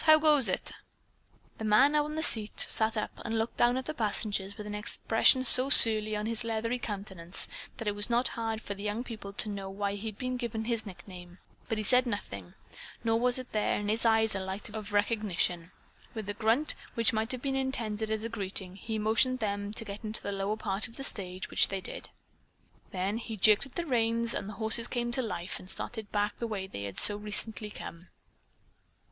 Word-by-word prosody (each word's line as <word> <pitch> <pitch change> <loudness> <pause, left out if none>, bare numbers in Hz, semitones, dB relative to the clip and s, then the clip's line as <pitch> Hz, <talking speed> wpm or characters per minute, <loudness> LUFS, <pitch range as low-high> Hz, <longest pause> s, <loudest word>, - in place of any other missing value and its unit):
How 310 0 +8
goes 300 -7 +4
it?" - - -1 0.9
The - - -5
man 220 +7 +5
on 300 0 0
the 315 - 0
seat 215 -7 +4
sat 220 0 +2
up 215 - -2
and 225 -1 -2
looked 225 +1 -2
down 240 +1 +3
at 260 - -3
the 310 - -4
passengers 205 -4 -1
with 210 - -7
an 210 - -6
expression 225 +4 +3
so 255 +2 +7
surly 215 -5 +8
on 210 0 -3
his 230 +1 -3
leathery 230 +2 -2
countenance 195 -5 -3 0.3
that 225 - -6
it 205 - +1
was 205 +2 +2
not 240 +1 +2
hard 225 -1 -4
for 200 - -4
the 200 - -10
young 210 +3 -2
people 220 -5 -8
to 210 - 0
know 200 -2 -5
why 200 +1 -2
he 205 +2 -6
had 215 -2 -6
been 255 0 -3
given 230 -2 -4
his 230 -2 -1
nickname, 180 -2 -11 0.3
but 225 - -1
he 215 - -2
said 250 +4 +4
nothing, 100 - -6 0.5
nor 225 -1 +2
was 245 +1 +3 0.2
there 215 -1 0
in 205 0 -3
his 220 +2 0
eyes 220 -1 +3
a 195 - -2
light 190 +3 -6
of 210 -1 -7
recognition. 205 -5 0 0.5
With 220 -3 -5
a 205 - -3
grunt, 225 +8 +1 0.2
which 230 -1 +2
might 220 +2 -1
have 255 -2 -5
been 270 -1 -1
intended 230 -5 -2
as 220 0 -2
a - - -1
greeting, 195 -4 -5
he 220 +3 -4
motioned 220 +4 +3
them 205 -2 -3
to 225 - -5
get 200 +1 -8
into 215 0 -4
the 200 - -3
lower 200 +2 -2
part 205 0 -3
of 230 - -16
the 270 - -6
stage, 185 -7 -3
which - - +4
they 195 - -4
did. - - -6 0.8
Then 195 +4 -2
he 225 -2 -6
jerked 210 +6 +4
at 260 - -21
the 345 - -2
reins 230 -3 +1
and 195 - -4
the - - -7
horses 220 +2 0
came 240 -1 -2
to 260 - +2
life 180 -6 -4
and 185 - -13
started 220 -1 -4
back 205 0 -1
the 235 - -2
way 205 -4 -4
they 100 - -7
had 100 -2 -7
so 205 - +5
recently 210 +1 -4
come. 175 -3 -10
215 Hz, 215 wpm, -30 LUFS, 200-230 Hz, 0.9 s, How